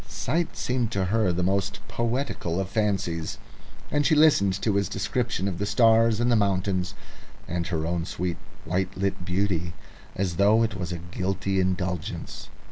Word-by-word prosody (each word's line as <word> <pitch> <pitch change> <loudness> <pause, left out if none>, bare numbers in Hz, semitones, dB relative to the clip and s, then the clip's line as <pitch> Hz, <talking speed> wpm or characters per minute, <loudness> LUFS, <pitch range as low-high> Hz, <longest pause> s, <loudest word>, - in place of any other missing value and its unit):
Sight 170 +2 -2
seemed 125 -2 0
to 95 -1 +1
her 105 0 +2
the 90 +1 -1
most 100 +2 0
poetical 115 -5 -2
of 95 -1 -2
fancies, 95 -6 -1 0.5
and 145 0 +2
she 155 +2 +4
listened 100 -12 +4
to 110 - +2
his 100 -2 +1
description 110 0 -1
of 90 -3 -3
the 100 - 0
stars 115 -1 +4
and 120 +1 +2
the - - +5
mountains 95 -3 0 0.5
and 85 0 -2
her 80 -3 -1
own 85 0 -1
sweet 90 -1 -3 0.3
white 95 +3 -1
lit 95 -1 -1
beauty 90 -2 -1 0.4
as 90 -3 -1
though 105 +4 +5
it 115 - 0
was 90 -1 -4
a 85 - -3
guilty 95 +3 -2
indulgence. 90 -2 -2
95 Hz, 165 wpm, -26 LUFS, 90-110 Hz, 0.5 s, the